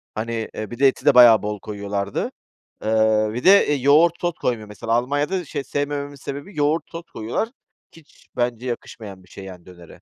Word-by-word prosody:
Hani, 115 0 -3
eee, 110 +1 -6
bir 120 - -8
de 140 - +6
eti 135 - -1
de - - +6
bayağı 120 -3 +8
bol 105 0 -3
koyuyorlardı. 100 -1 -4 0.5
Iıı, 110 -1 +2
bir 125 +3 -5
de, 200 +2 +6
eee, 150 - +2
yoğurt 145 +5 +4
sos 175 -1 0
koymuyor 110 -4 -2
mesela. 115 +2 -4
Almanya'da 145 +9 0
şey 145 -1 -5
sevmememin 145 0 -3
sebebi 140 +6 -8
yoğurt 150 +3 +1
sos 165 0 -7
koyuyorlar. 115 - -3 0.4
Hiç 165 -3 -21
bence 120 0 -1
yakışmayan 105 -5 -7
bir 90 - -23
şey 100 - -11
yani 90 -2 -11
dönere. 85 -2 -15
120 Hz, 185 wpm, -22 LUFS, 105-145 Hz, 0.5 s, bayağı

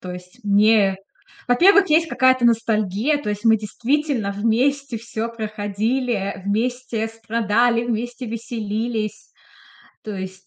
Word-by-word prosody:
то 185 - -7
есть 180 0 -12
мне 205 -1 +4 0.5
во-первых, 380 +8 +5
есть 325 +2 +4
какая-то 260 -3 +3
ностальгия. 225 +4 +1
То 210 - -5
есть 210 +1 -5
мы 225 -1 +5
действительно 240 +1 -1
вместе 240 +5 0
всё 230 0 -4
проходили, 215 -1 -2
вместе 230 +1 -1
страдали, 230 +1 0
вместе 240 +2 -3
веселились. 220 -1 -4 0.7
То 215 - -6
есть 190 0 -8
225 Hz, 115 wpm, -21 LUFS, 210-245 Hz, 0.7 s, во-первых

